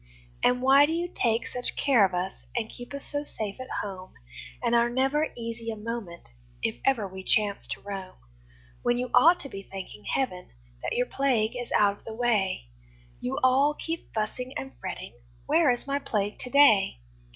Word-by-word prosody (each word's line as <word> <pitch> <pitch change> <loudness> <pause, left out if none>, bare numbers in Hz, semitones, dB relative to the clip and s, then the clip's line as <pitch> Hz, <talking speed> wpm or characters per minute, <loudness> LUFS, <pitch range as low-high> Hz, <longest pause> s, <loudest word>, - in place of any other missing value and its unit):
And 250 0 +3
why 275 +2 +7
do 320 - -1
you 340 +1 -1
take 235 -9 0
such 250 0 -3
care 265 -7 +4
of 190 -2 +2
us, 180 +2 -1 0.2
And 225 -2 -2
keep 245 - -10
us 280 0 -1
so 290 0 -2
safe 215 -6 -2
at 255 - -4
home, 185 -2 -7 0.5
And - - +1
are 235 0 +4
never 270 +5 +1
easy 230 0 -5
a 225 - -3
moment 215 - -6 0.3
If 110 +2 -1
ever 235 -7 +2
we 190 0 -9
chance 205 0 +1
to - - -5
roam? 195 -2 -6 0.7
When 240 - +2
you 250 0 -3
ought 340 +3 +7
to - - -3
be 195 -7 -7
thanking 185 - -9
Heaven 185 -10 -2 0.3
That - - -2
your 245 - +2
plague 250 -5 +1
is 245 -1 -5
out 205 -1 +3
of - - -26
the 225 - -6
way, 215 - +1 0.5
You 125 - -3
all 275 +3 +4
keep 330 +1 -5
fussing 250 +4 -3
and 270 - -6
fretting 185 0 -6 0.3
"Where 315 0 +4
is 245 -1 0
my 280 0 0
Plague 205 -6 -2
to 250 - -6
day?" 245 - +5
235 Hz, 190 wpm, -27 LUFS, 200-270 Hz, 0.7 s, why